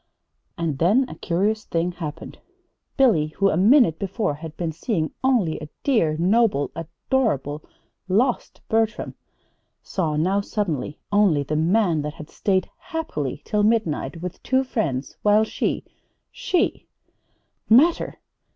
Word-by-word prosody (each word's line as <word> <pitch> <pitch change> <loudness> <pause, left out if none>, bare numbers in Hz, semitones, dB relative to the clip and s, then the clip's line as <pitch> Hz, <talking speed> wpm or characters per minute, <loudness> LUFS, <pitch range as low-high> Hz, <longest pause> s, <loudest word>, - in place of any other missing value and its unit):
And 160 -5 -2
then 225 +10 +3
a - - -8
curious 205 +5 -1
thing 170 +1 -1
happened. 155 -4 -7 0.6
Billy, 225 - +4
who, 195 0 +3
a - - 0
minute 210 - +5
before, 195 -3 -1
had 155 +1 -9
been 170 -2 -2
seeing 160 0 -2
only 235 -12 +2
a 150 -1 -8
dear, 170 - +2
noble, 190 -4 +2
adorable, 165 - -1 0.5
lost 230 +7 0
Bertram, 225 0 0 0.7
saw 160 -5 -2
now 185 +6 +1
suddenly 170 - -3
only 200 -8 +3
the 150 +2 -3
man 170 0 +2
that 150 +1 -5
had 155 - -11
stayed 190 -2 0
happily 315 - -4
till 210 -2 0
midnight 175 -8 0
with 180 - -6
two 260 0 +1
friends, 160 - -3
while 210 +1 +4
she 220 - -2 0.5
she 355 - -1 0.8
"Matter! 290 +10 +4
185 Hz, 130 wpm, -23 LUFS, 155-225 Hz, 0.8 s, minute